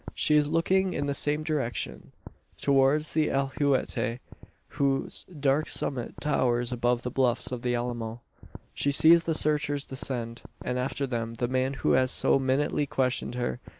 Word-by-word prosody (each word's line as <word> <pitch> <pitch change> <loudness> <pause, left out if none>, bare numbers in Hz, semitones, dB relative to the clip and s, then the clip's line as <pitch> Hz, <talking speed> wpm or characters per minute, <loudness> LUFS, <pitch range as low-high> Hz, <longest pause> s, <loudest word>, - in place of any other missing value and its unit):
She 150 - +2
is 150 -1 +3
looking 185 +3 +1
in 145 - -2
the 140 - -1
same 150 +2 +1
direction 145 -7 -3 0.5
towards 140 +2 +2
the 155 -1 +2
alhuehuete; 135 -4 0 0.5
whose 140 -2 -1
dark 145 -3 0
summit 125 -4 -1
towers 125 -4 +1
above 120 0 0
the 125 - -3
bluffs 130 -2 0
of 125 -2 -4
the 125 0 0
Alamo. 120 -1 -4 0.5
She 140 - 0
sees 165 +4 +6
the 165 - +1
searchers 150 -2 0
descend; 120 -3 -4 0.2
and, 125 0 -1
after 135 +2 -2
them, 115 -3 -3
the 120 +1 -1
man 130 +2 0
who - - +4
has 130 0 +3
so 135 - +2
minutely 135 +2 0
questioned 130 -2 -1
her. 120 0 -2
135 Hz, 155 wpm, -27 LUFS, 125-145 Hz, 0.5 s, sees